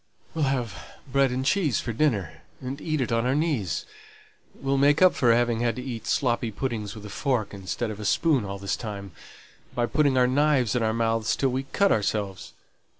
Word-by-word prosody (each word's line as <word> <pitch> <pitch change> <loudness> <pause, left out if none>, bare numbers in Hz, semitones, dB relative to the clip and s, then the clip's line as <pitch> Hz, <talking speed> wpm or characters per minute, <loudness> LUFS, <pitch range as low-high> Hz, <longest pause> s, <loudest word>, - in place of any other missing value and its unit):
"We'll 160 -3 +1
have 125 -6 -1 0.3
bread 135 0 +3
and 130 +1 -2
cheese 150 - +2
for 120 - -3
dinner, 105 - 0 0.2
and 135 +3 -6
eat 155 -3 -1
it 125 - -1
on 115 +1 +1
our 130 - +2
knees; 145 - -1 0.7
we'll 135 0 -1
make 145 +2 +4
up 185 -1 +6
for 120 -3 +3
having 120 -1 +2
had 120 -1 0
to 125 - -6
eat 120 -4 -6
sloppy 120 -3 +1
puddings 110 -2 -4
with 105 -1 -10
a - - -7
fork 125 -5 -1
instead 100 +4 -3
of 105 - -8
a 105 - -5
spoon 145 - +2
all 100 0 -5
this 100 0 -2
time, 100 -4 -6 0.6
by 120 - +1
putting 140 0 +2
our 125 - +5
knives 135 -2 +2
in 125 - +1
our 110 -1 +2
mouths 115 -1 0
till 135 - +1
we 130 +2 -2
cut 200 -1 +3
ourselves. 100 -2 -1
120 Hz, 205 wpm, -26 LUFS, 110-135 Hz, 0.7 s, up